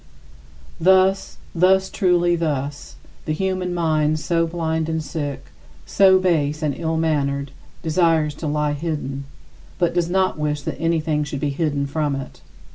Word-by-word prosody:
Thus, 190 +2 +3 0.2
thus, 190 +2 +3
truly 175 -3 +2
thus: 145 -3 -3 0.3
the 155 - -1
human 185 +1 -1
mind 155 -3 +1
so 165 +2 0
blind 160 -1 -2
and 160 -1 -1
sick, 145 -3 -5 0.3
so 190 -1 +5
base 155 -5 0
and 150 -2 +1
ill 165 -1 -2
mannered, 140 -4 0 0.3
desires 160 -2 +2
to 160 - -2
lie 150 0 0
hidden, 145 -3 -4 0.5
but 175 -2 +1
does 175 -1 0
not 185 -3 +1
wish 150 -1 -1
that - - -5
anything 160 -2 +1
should 140 -1 -5
be 145 +1 -1
hidden 145 -1 -1
from 145 0 -1
it. 135 -1 -8
160 Hz, 145 wpm, -21 LUFS, 150-175 Hz, 0.5 s, so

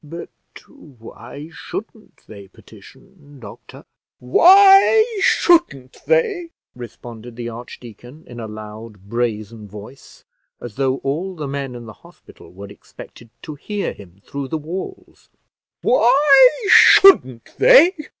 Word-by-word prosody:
"But 165 +3 -11 0.4
why 140 - -14
shouldn't 220 +4 -11
they 100 -2 -14
petition, 140 - -20
doctor?" 105 -4 -15 0.3
"Why 390 - +4 0.2
shouldn't 330 - 0
they!" 425 -9 -1 0.3
responded 120 -1 -12
the 120 0 -7
archdeacon, 120 +4 -13
in 120 -1 -13
a 110 - -8
loud 105 -1 -12
brazen 110 -2 -5
voice, 105 +6 -15 0.4
as 120 - -10
though 130 +1 -2
all 170 +8 -5
the 150 -4 -7
men 135 -2 -7
in 120 -1 -11
the 110 - -12
hospital - - -19
were 100 +2 -13
expected 115 +3 -16
to 155 - -9
hear 205 +8 -6
him 95 0 -18
through 140 -1 -7
the 160 - -5
walls; 185 - -10 0.5
"why 265 +2 +4 0.2
shouldn't 130 - +4
they? 425 -6 +5
135 Hz, 120 wpm, -18 LUFS, -, 0.5 s, they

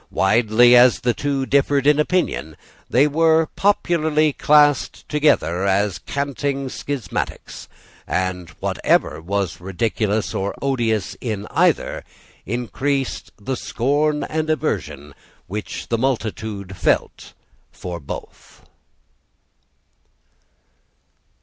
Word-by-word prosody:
Widely 115 +4 +4
as 125 0 +6
the 120 0 +1
two 140 0 -2
differed 140 0 +2
in 150 0 +4
opinion, 150 - -1 0.3
they 130 +4 +4
were 160 +1 +3
popularly 160 -6 +2
classed 145 -1 +3
together 100 - +1
as 100 0 +1
canting 140 -1 -3
schismatics; 140 -2 -5 0.4
and 90 -1 -2
whatever 75 - 0
was 95 -1 -3
ridiculous 105 +2 -1
or 100 +1 -2
odious 115 -7 -1
in 105 -4 -3
either - - +1 0.4
increased 130 +4 -2
the 130 +6 -3
scorn 145 +6 0
and 155 0 -2
aversion 90 - -2 0.3
which 105 +3 -6
the 115 - 0
multitude 110 -6 -3
felt - - -1 0.4
for 90 -2 -7
both. 70 - -10
125 Hz, 95 wpm, -21 LUFS, 100-145 Hz, 0.4 s, as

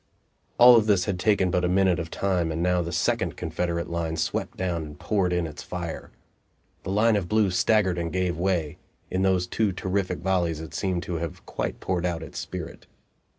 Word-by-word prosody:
All 120 -1 +9
this 100 -4 +2
had 95 -3 -2
taken 95 -2 +2
but 90 0 +1
a - - +3
minute 95 -1 +3
of 85 -1 -4
time, 90 -4 0
and 80 +2 -2
now 90 0 +2
the 85 0 -4
second - - 0
Confederate 85 -1 -2
line 85 -1 -2
swept - - -2
down 90 -3 -1
and 75 -1 -9
poured 95 -4 0
in 90 -1 0
its 80 -1 -7
fire. 85 -2 -6 0.7
The - - -7
line 110 +3 +3
of 95 -4 -1
blue 105 -3 +3
staggered 95 -1 +2
and 85 -1 -3
gave 90 0 0
way; 85 -3 -1 0.3
in 95 - 0
those 95 -2 +2
two 105 +3 0
terrific 95 +1 -2
volleys 85 -4 0
it 80 -1 -8
seemed 95 -3 -1
to 85 - -3
have 85 -1 -6
quite - - -4
poured 90 -1 -1
out 85 -2 -3
its 80 - -7
spirit. - - -7
90 Hz, 195 wpm, -26 LUFS, 85-95 Hz, 0.7 s, All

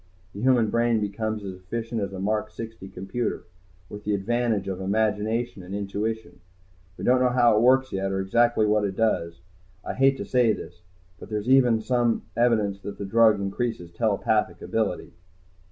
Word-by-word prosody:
The 100 - -7
human 120 -4 +3
brain 115 -1 +2
becomes 105 +1 -3
as 95 -1 -5
efficient 110 +5 -4
as 100 -1 -3
a 95 - -7
Mark 105 +2 -1
60 115 -2 -8
computer, 95 +6 -4 0.4
with 105 +2 -9
the 105 0 0
advantage 115 -1 0
of 95 -1 -4
imagination 110 +2 -1
and 90 +2 -7
intuition. 105 +2 -4 0.6
We - - -8
don't 125 +1 +4
know 125 - +4
how 120 -3 +4
it 105 - +3
works 130 +2 +4
yet, 95 0 -1
or 95 - -1
exactly 115 +3 +2
what 105 0 +2
it 100 -2 -2
does. 85 -7 0 0.4
I - - -3
hate 135 +1 +3
to - - -5
say 125 -4 +3
this. 90 -3 -9 0.4
But - - -11
there's 105 +2 -3
even 125 -4 +5
some 120 -1 +1
evidence 110 -5 +2
that 100 +1 -7
the 100 - -5
drug 110 0 +4
increases 100 -3 -3
telepathic 110 +2 0
ability." 110 -7 -2
110 Hz, 175 wpm, -25 LUFS, 100-120 Hz, 0.6 s, even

